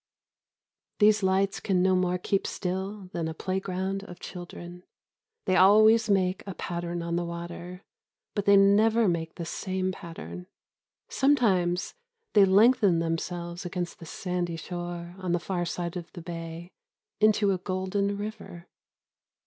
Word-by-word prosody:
These 210 0 +5
lights 190 +1 +1
can 185 -3 +1
no 185 0 +4
more 180 0 +1
keep 195 +2 -1
still 190 +1 -4
than 165 -2 -2
a 160 - -5
playground 190 +1 -2
of 180 -2 -11
children. 175 0 -9 0.6
They 185 - +2
always 215 +4 +6
make 190 -2 +2
a 195 - -5
pattern 175 0 -4
on 170 0 -1
the 175 - 0
water, 170 +2 -7 0.5
but 205 -2 -2
they 200 0 +7
never 215 +3 +5
make 165 -2 -1
the 170 - -5
same 185 +2 -2
pattern. 180 0 -9 0.6
Sometimes 195 -11 +2 0.4
they 205 -2 +7
lengthen 205 -1 +5
themselves 170 +2 -3
against 175 -1 -4
the 165 - -10
sandy 180 -1 -3
shore 175 +1 -6
on 185 -2 -2
the 175 - +2
far 175 0 -2
side 170 0 -4
of 175 -2 -6
the 175 - -8
bay 165 0 -7 0.5
into 210 -1 +4
a 185 - -1
golden 190 +2 -1
river. 205 -5 -7
185 Hz, 140 wpm, -27 LUFS, 175-195 Hz, 0.6 s, they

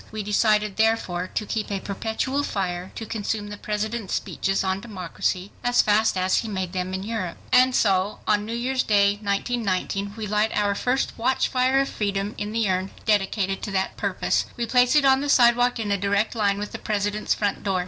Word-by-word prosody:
We 215 -1 -4
decided 210 0 +2
therefore 220 -5 +1
to 210 - -1
keep 215 +1 -3
a 200 -1 -2
perpetual 220 +8 -2
fire 185 -7 -3
to 225 - -5
consume 210 -1 -3
the 205 - -6
President's 215 0 -3
speeches 195 0 -1
on 190 0 -1
democracy 185 -2 -3
as 245 0 +3
fast 210 -1 +2
as 185 0 +2
he 225 - -1
made 190 -4 -3
them 185 0 -2
in 190 - -4
Europe. 210 -5 -4
And 255 0 +5
so 195 -1 +2
on 210 -1 +2
New 225 +2 -4
Year's 255 +2 0
Day, 205 -1 +3
1919, 200 -1 -1
we 220 - -4
light 210 +1 0
our 205 -1 +2
first 250 +6 0
watchfire 260 +1 +2
of 275 - -1
freedom 200 -2 -2
in 210 0 -3
the 225 -1 0
Urn 185 0 0 0.2
dedicated 195 -2 +1
to - - -4
that 190 0 -1
purpose. - - 0
We 240 - -1
place 250 +3 +3
it 295 -2 +5
on 265 0 +5
the 290 - -2
sidewalk 245 -1 +4
in 210 -2 -2
a 200 - +1
direct 200 +2 +1
line 205 -3 +1
with 205 +1 -5
the - - -6
President's 210 0 -1
front 205 -2 -1
door. 195 -2 0
210 Hz, 200 wpm, -24 LUFS, 195-230 Hz, 0.2 s, And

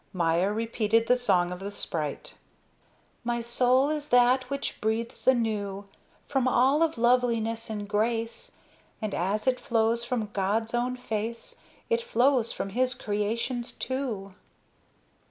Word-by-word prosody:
Maya 175 +2 +2
repeated 225 0 +1
the 250 - +4
song 180 -8 +2
of 180 - -5
the 195 +1 -5
sprite. 155 -7 -4 0.9
My 240 0 -1
soul 250 +4 +2
is 300 -1 -3
that 250 +1 +4
which 280 0 -3
breathes 225 +3 -2
anew 210 -5 +1 0.4
From 265 -2 +1
all 265 +4 +3
of 325 -5 +2
loveliness 230 -2 +1
and 210 -2 -4
grace; 225 - -1 0.5
And 215 -2 -3
as 195 +5 -1
it 260 -1 +2
flows 230 0 +1
from 235 -4 -2
God's 210 +4 0
own 245 +1 0
face, 230 -1 -5 0.3
It 470 0 +1
flows 255 - +2
from 195 - -4
his 255 +4 0
creations, 230 +4 -2
too. 235 -8 -4
230 Hz, 135 wpm, -27 LUFS, 210-250 Hz, 0.9 s, the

